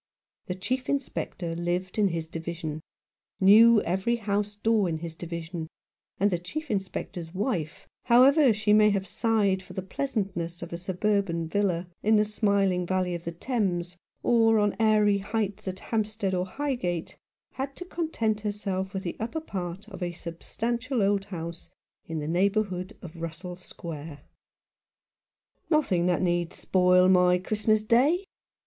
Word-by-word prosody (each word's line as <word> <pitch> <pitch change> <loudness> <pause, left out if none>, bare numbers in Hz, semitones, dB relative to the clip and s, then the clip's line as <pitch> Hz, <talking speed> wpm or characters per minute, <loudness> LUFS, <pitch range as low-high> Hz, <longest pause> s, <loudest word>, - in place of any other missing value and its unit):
The 180 - -2
Chief 255 +7 -3
Inspector 190 -10 -2
lived 180 +3 -2
in 205 - +5
his 165 -3 -3
Division, 160 -1 -5 0.6
knew 215 +3 +7
every 190 +7 0
house 205 -2 -1
door 210 -2 +2
in 160 - -1
his 165 0 -6
Division, 170 0 -6 0.5
and 200 +2 +3
the 175 - 0
Chief 295 - -5
Inspector's 185 -3 -4
wife, 185 - -2 0.2
however 260 +3 +6
she 210 -1 +2
may 210 0 +6
have 200 -2 0
sighed 200 -1 +1
for 185 0 -12
the 190 - -4
pleasantness 190 -8 -3
of 170 - -7
a - - -2
suburban 185 -2 0
villa, 180 -1 0
in 220 +1 +4
the 210 0 +4
smiling 200 -4 +1
valley 185 -1 0
of 170 -1 -5
the 170 - -2
Thames, 180 -3 -2 0.3
or 225 -2 +4
on 205 -1 +2
airy 210 -2 +4
heights 205 -1 -3
at 185 0 -3
Hampstead 215 -2 -2
or 180 0 0
Highgate, 185 - -3 0.4
had 270 +1 -4
to 360 - -7
content 235 -12 -1
herself 200 -2 -3
with 190 - -2
the 175 - -4
upper 235 +9 -2
part 190 - -6
of 195 -3 -10
a 175 -1 -2
substantial 230 +8 -2
old 200 0 +2
house 170 -3 -7 0.4
in 160 - -4
the 150 -1 -3
neighbourhood 185 +1 0
of 165 -1 -9
Russell 170 +2 -5
Square. 160 -4 -8 1.5
"Nothing 195 - +2
that 180 +1 +1
need 175 -1 0
spoil 180 0 +4
my 180 -1 +5
Christmas 215 +3 +1
Day!" 270 - +3
190 Hz, 150 wpm, -27 LUFS, 175-215 Hz, 1.5 s, knew